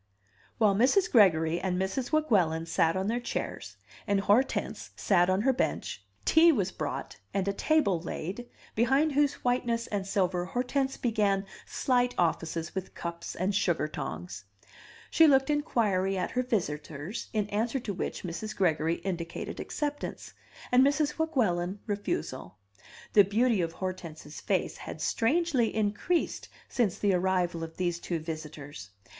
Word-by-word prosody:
While 210 -3 +4
Mrs. 265 - +3
Gregory 170 -7 +5
and 180 0 -1
Mrs. 195 +7 -2
Weguelin 190 - +2
sat 165 0 +2
on 190 - -1
their 230 +4 0
chairs, 245 - -5 0.3
and 200 -1 +2
Hortense 210 +7 +1
sat 175 -2 +3
on 185 +2 +2
her 265 +4 +3
bench, 255 - -2 0.2
tea 330 +1 +6
was 205 - 0
brought - - -5 0.2
and 195 -1 0
a 200 - +1
table 200 - +2
laid, 190 +8 -5 0.2
behind 270 +7 +3
whose 290 0 +2
whiteness 240 -2 0
and 200 -2 -3
silver 185 -3 +1
Hortense 265 +5 -1
began 205 -4 +1 0.2
slight 245 -1 +1
offices 165 -1 -1
with 190 -1 -5
cups 170 0 -5
and 190 +3 0
sugar 175 -6 +1
tongs. 95 - -6 0.7
She 325 - +6
looked 270 0 +4
inquiry 205 -10 +1
at 180 - -2
her 250 - +1
visitors, 165 - -3
in 215 -3 0
answer 225 +6 0
to 205 - -4
which 185 - -4
Mrs. 180 +5 -5
Gregory 165 -4 +1
indicated 175 -3 -4
acceptance, 290 -1 -4 0.4
and 250 +1 +6
Mrs. 290 +2 +1
Weguelin 205 - 0
refusal. 165 - -3 0.6
The 205 - +8
beauty 220 +1 +2
of 165 -1 -2
Hortense's 170 -5 -6
face - - -1
had - - -8
strangely 260 -2 +1
increased 215 +11 0 0.2
since 215 -7 0
the 200 -2 +2
arrival 180 -2 +1
of 160 0 -8
these 175 -2 -1
two 170 0 -2
visitors. 155 - -7
200 Hz, 145 wpm, -29 LUFS, 170-245 Hz, 0.7 s, The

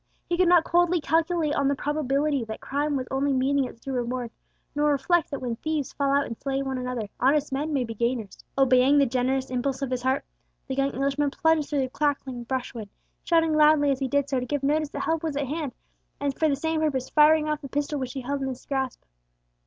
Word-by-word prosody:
He 350 - -1
could 365 0 +3
not 345 -2 +6
coldly 350 +1 +2
calculate 320 0 +1
on 280 - +1
the 280 - +2
probability 285 -1 0
that 220 0 -6
crime 290 +2 -1
was 255 -2 -2
only 275 +1 +1
meeting 270 +1 +2
its 230 - -10
due 270 +3 -6
reward, 245 -1 -2 0.4
nor 295 +1 +2
reflect 295 +4 +2
that 280 - -5
when 235 -2 -2
thieves 310 -1 -2
fall 280 -1 0
out 280 0 +3
and 230 - -6
slay 275 +3 -2
one 265 -1 -3
another, 250 -4 -3
honest 285 +3 +2
men 295 +4 -1
may 275 -4 +1
be 230 -1 -5
gainers. 235 -2 -3
Obeying 265 +1 +5
the 280 - +5
generous 260 +1 -1
impulse 260 +2 -1
of 265 - -3
his 250 -1 -1
heart, 260 +2 0 0.4
the 265 - -3
young 275 +1 +1
Englishman 280 +2 0
plunged 320 -1 +1
through 290 -2 +1
the 260 - 0
crackling 270 -4 -2
brushwood, 245 -4 -4 0.3
shouting 325 -2 +2
loudly 300 -1 +5
as 270 - -1
he 270 - -1
did 285 +1 +1
so 270 -2 0
to 250 - -4
give 290 0 -2
notice 300 +1 +1
that - - -5
help 325 -1 0
was 315 -4 -3
at 285 - 0
hand, 295 0 -3 0.5
and 280 -1 -1
for 315 - +2
the 280 - +2
same 320 +2 -1
purpose 270 -5 -1
firing 305 0 +5
off 300 -1 -1
the 275 - -8
pistol 290 +2 -2
which 255 -2 -4
he 270 - -4
held 275 +2 -3
in 270 - -1
his 260 -2 -6
grasp. 265 -3 -3
275 Hz, 230 wpm, -26 LUFS, 260-300 Hz, 0.5 s, not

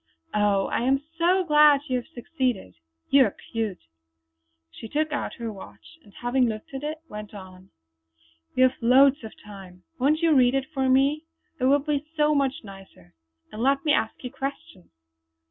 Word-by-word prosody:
Oh, 205 -2 +2
I - - -2
am 265 +3 +2 0.2
so 365 +3 +3
glad 300 -3 +5
you 255 - 0
have 245 - -6
succeeded. 255 - -3 0.4
You 275 -2 +6
are 205 - -4 0.2
cute!" 220 -5 -3 0.9
She 225 - -10
took 310 +4 -1
out 295 - -3
her 230 -3 -5
watch, 205 +10 -14
and 205 - -19
having 245 +3 0
looked 215 +4 -7
at 270 - -5
it, 305 +1 -5
went 210 0 -9
on: 185 -1 -12 0.9
"We 255 - +4
have 255 0 +4
loads 265 +3 +5
of 220 - -8
time. 190 -3 -12 0.2
Won't 300 +5 +2
you 330 -2 +4
read 255 -2 +4
it 270 -1 0
for 265 -2 0
me? 280 +4 +2 0.3
It 255 - 0
will 275 +2 +5
be 290 0 -2
so 300 0 +3
much 280 0 -1
nicer! 195 - -14 0.4
And 215 - -7
let 275 +3 +1
me 300 - +3
ask 225 - -1
you 250 - -6
questions." 275 - -7
260 Hz, 180 wpm, -25 LUFS, 215-290 Hz, 0.9 s, You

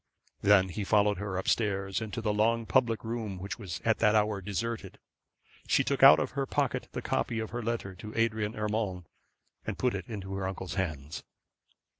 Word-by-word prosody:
Then 100 -2 +5
he 100 +3 -4
followed 105 -1 +3
her 100 -2 -3
up 95 - -3
stairs, 100 -2 0
and 110 +1 -5
in 115 - -3
the 105 -1 +1
long 115 +2 +2
public 115 +3 +2
room, 110 -4 -4
which 95 +5 -6
was 90 -6 -5
at 110 -1 +2
that 105 -1 +4
hour 105 -1 +2
deserted, 105 +1 -4 0.7
she - - +3
took - - -1
out - - +10
of - - -1
her 135 +1 -2
pocket - - -1
the - - -4
copy 115 - -1
of 110 -1 -3
her 120 +1 -3
letter 115 -4 -3
to 105 +4 -9
Adrian 110 -1 0
Urmand, 105 -4 -2 0.6
and - - -4
put 125 -1 +1
it 95 -2 -5
into 95 -4 -6
her 95 -1 -2
uncle's 95 -2 -5
hands. 75 -6 -3
105 Hz, 195 wpm, -30 LUFS, 95-110 Hz, 0.7 s, out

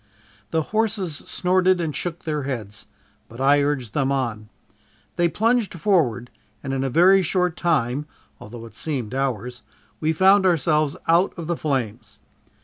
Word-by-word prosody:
The 160 -1 0
horses 205 -7 0
snorted 185 +4 +1
and 160 -4 -2
shook 175 -1 -4
their 150 -2 -2
heads, 110 -6 -6 0.4
but 115 - -12
I 140 +2 +4
urged 135 -6 -2
them 140 -2 0
on. 115 -6 -2 0.7
They 175 0 +2
plunged 225 +2 +1
forward 140 - +1 0.3
and 135 -1 -3
in 135 0 -1
a 135 - -1
very 185 +7 +5
short 180 0 0
time 150 -5 0 0.3
(although 115 +2 -10
it 115 - -13
seemed 130 -8 -3
hours) 125 -3 -3 0.4
we 155 0 +1
found 190 +4 +5
ourselves 155 -2 +1
out 170 +4 +3
of 170 - -5
the 170 +1 -1
flames. 115 -8 -3
150 Hz, 150 wpm, -23 LUFS, 125-175 Hz, 0.7 s, very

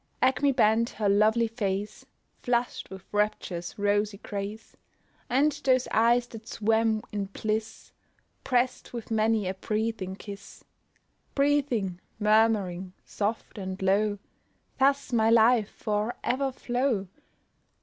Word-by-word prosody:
Acmè 265 +2 +3
bent 230 0 +3
her 210 - -2
lovely 215 +3 +4
face, 205 -3 -3 0.3
Flush'd 245 0 -1
with 190 -1 -10
rapture's 205 -4 -2
rosy 205 0 +1
grace, 205 +2 -6 0.5
And 280 +5 +3
those 255 -1 +3
eyes 235 +2 +4
that 225 0 -10
swam 220 0 +1
in 205 -1 -2
bliss, 215 +2 -4 0.5
Prest 250 0 0
with 235 -1 -7
many 220 -2 +2
a 185 - -1
breathing 210 -1 -2
kiss; 200 0 -10 0.7
Breathing, 265 -11 +1 0.2
murmuring, 210 -4 +2
soft, 215 +1 -3
and 190 0 -5
low, 205 +2 +2 0.6
Thus 275 -1 +2
might 225 -1 +4
life 230 -1 +5
for 210 +2 -2
ever 270 +2 0
flow! 245 -5 -1
220 Hz, 115 wpm, -27 LUFS, 205-235 Hz, 0.7 s, life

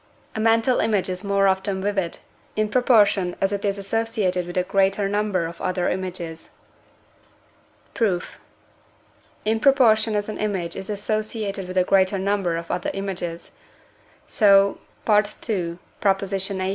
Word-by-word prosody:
A - - -4
mental 225 +3 +3
image 205 -4 +1
is 185 +1 -4
more 200 -1 +2
often 190 0 0
vivid, 195 -4 -1 0.4
in 215 0 0
proportion 205 -6 +3
as 195 - +1
it 200 - -3
is 200 -1 0
associated 200 -3 -1
with 175 - -6
a 180 - +3
greater 195 +1 +1
number 205 -3 0
of 165 +1 -8
other 185 -1 -1
images. 175 -3 -5 1.4
Proof. 190 -6 -1 1.1
In 220 +1 +1
proportion 225 -5 +4
as 205 0 -1
an 215 - -6
image 190 -5 -2
is 190 +1 -7
associated 210 -1 -3
with 185 +1 -5
a 185 - +5
greater 190 +1 +3
number 190 -3 0
of 170 0 -6
other 180 - -2
images, 175 -4 -5 0.7
so 200 -2 +4 0.3
(II. 210 -4 0 0.2
xviii.) 195 -2 +3
195 Hz, 135 wpm, -23 LUFS, 185-215 Hz, 1.4 s, a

